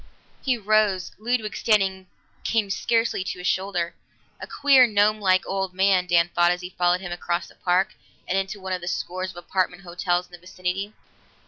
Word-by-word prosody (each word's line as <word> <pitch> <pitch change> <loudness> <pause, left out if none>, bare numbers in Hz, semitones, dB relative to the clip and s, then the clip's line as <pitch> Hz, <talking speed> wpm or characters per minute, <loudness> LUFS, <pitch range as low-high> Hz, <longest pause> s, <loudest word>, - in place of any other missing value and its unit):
He 255 -2 +1
rose; 210 -4 +1
Ludwig, 225 -1 -1
standing, 195 -4 +1 0.4
came 215 -3 0
scarcely 225 -1 0
to 190 - -5
his 180 - -8
shoulder. 185 -3 -1 0.5
A - - -6
queer 270 -3 +5
gnomelike 205 -3 +3
old 195 -1 -3
man, 190 -1 +3
Dan 170 -1 +3
thought 175 0 +4
as 180 0 0
he 180 0 -7
followed 180 0 +1
him 185 -2 -6
across 175 0 -2
the - - -16
park 185 +1 +1 0.3
and 185 - -1
into 195 +1 -2
one 190 -1 -4
of 180 - -3
the 175 - -7
scores 185 +1 -3
of 180 - -11
apartment 180 +1 -2
hotels 175 0 -1
in 180 - -27
the 175 - -11
vicinity. 185 +3 -4
185 Hz, 185 wpm, -24 LUFS, 180-205 Hz, 0.5 s, queer